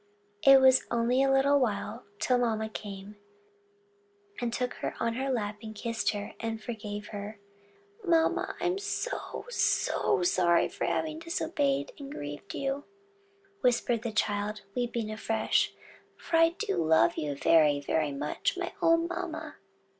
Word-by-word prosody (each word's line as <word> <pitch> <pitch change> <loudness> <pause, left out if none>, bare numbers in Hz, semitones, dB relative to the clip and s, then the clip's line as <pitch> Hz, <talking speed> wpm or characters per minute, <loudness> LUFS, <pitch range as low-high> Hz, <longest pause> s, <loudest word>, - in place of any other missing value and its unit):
It 275 -1 +8
was 260 -1 +5
only 240 +2 +2
a 270 0 +3
little 280 +1 +4
while 235 0 -2
till 250 +3 +2
mamma 220 -2 0
came, 205 -1 -8 1.3
took 250 +1 -2
her - - -3
on 230 0 0
her 265 +3 -2
lap, 210 -4 -2
kissed 230 0 -1
and 225 +2 -5
forgave 210 -2 -6
her. 205 +1 -6 0.7
"Mamma, 330 -3 +2
I'm 360 +2 0
so, 445 +5 -4
so 185 - +1
sorry 175 -1 +3
for - - -3
having 315 0 -1
disobeyed 295 -4 -1
and 280 -1 -8
grieved 145 - -7
you!" 275 +1 -2 0.8
whispered 240 -2 +2
the 230 -1 -3
child, 210 0 -1
weeping 235 -3 -2
afresh: 220 +1 +1 0.5
"for 335 - -1
I 330 0 +6
do 430 -1 -1
love 160 -8 +4
you 145 -2 -2
very, 150 0 +4
very 150 +1 0
much, 145 - -2
my 355 -1 -3
own 330 0 +4
mamma." 350 0 -5
230 Hz, 135 wpm, -29 LUFS, 205-280 Hz, 1.3 s, It